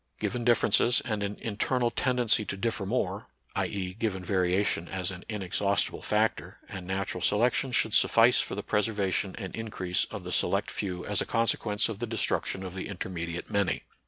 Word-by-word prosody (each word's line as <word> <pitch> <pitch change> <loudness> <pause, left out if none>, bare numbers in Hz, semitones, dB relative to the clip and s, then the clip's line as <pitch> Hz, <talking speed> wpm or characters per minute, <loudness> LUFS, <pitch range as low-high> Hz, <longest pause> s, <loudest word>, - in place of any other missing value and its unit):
Given 120 0 -2
differences 120 +1 +4
and 105 -3 -2
an 100 0 -3
internal 120 +3 0
ten 125 -1 0
dency 115 -3 +3
to 100 - -3
differ 110 -1 -1
more, 100 -3 -1 0.3
i.e., 95 -2 -2
given 100 -3 -2
variation 90 -1 +1
as 95 -1 -1
an 90 -1 -9
inexhaustible 100 -1 0
factor, 105 -4 0
and 95 -3 -7
natural 95 -1 -2
selection 120 +7 +2
should - - +1
suffice - - +5
for - - -2
the - - -4
preservation 100 -3 0
and 95 -4 -6
increase 95 -5 -1
of - - -8
the - - -6
select - - +1
few 90 -3 -3
as 105 -3 +1
a - - -1
consequence 115 -2 +1
of 110 -3 -5
the 120 - -2
destruction 110 -3 -1
of 90 - -6
the 95 - -4
intermediate 85 -3 -5
many. 100 -3 +1
100 Hz, 175 wpm, -29 LUFS, 95-110 Hz, 0.3 s, suffice